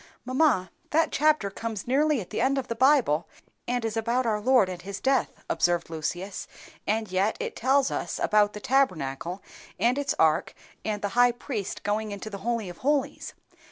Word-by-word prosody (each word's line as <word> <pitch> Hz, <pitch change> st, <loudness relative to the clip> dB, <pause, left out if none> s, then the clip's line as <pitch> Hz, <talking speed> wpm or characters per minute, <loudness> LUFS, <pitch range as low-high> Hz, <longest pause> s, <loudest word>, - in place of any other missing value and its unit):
"Mamma, 255 Hz, -, +2 dB, 0.2 s
that 325 Hz, +2 st, +2 dB
chapter 300 Hz, -9 st, +2 dB
comes 220 Hz, -1 st, -5 dB
nearly 290 Hz, +3 st, +2 dB
at 185 Hz, -, -8 dB
the -, -, -1 dB
end 275 Hz, +1 st, +2 dB
of 265 Hz, -, -2 dB
the 230 Hz, -, -2 dB
Bible, 250 Hz, -, +3 dB, 0.4 s
and 245 Hz, -1 st, -1 dB
is 225 Hz, 0 st, -2 dB
about 235 Hz, +3 st, 0 dB
our 215 Hz, -2 st, 0 dB
Lord 250 Hz, -3 st, +4 dB
and 180 Hz, -1 st, -6 dB
his 200 Hz, +2 st, -6 dB
death," 265 Hz, -2 st, 0 dB
observed 175 Hz, -1 st, +1 dB
Lucius; 175 Hz, +5 st, -4 dB, 0.4 s
"and 215 Hz, -1 st, 0 dB
yet 190 Hz, +3 st, +1 dB
it -, -, -4 dB
tells 270 Hz, +2 st, +2 dB
us -, -, -3 dB
about 210 Hz, -1 st, +3 dB
the 210 Hz, -, -6 dB
Tabernacle, 180 Hz, -, 0 dB, 0.4 s
and 245 Hz, +4 st, +2 dB
its 285 Hz, -, -1 dB
ark, 160 Hz, 0 st, +2 dB, 0.3 s
and 210 Hz, -1 st, -3 dB
the 205 Hz, -, 0 dB
high 245 Hz, +3 st, +4 dB
priest 235 Hz, -4 st, -5 dB
going 210 Hz, +1 st, -1 dB
into 205 Hz, +2 st, -6 dB
the 200 Hz, -, -6 dB
Holy 230 Hz, -1 st, -2 dB
of 175 Hz, -, -9 dB
holies. 285 Hz, 0 st, -1 dB
220 Hz, 185 wpm, -27 LUFS, 195-260 Hz, 0.4 s, Lord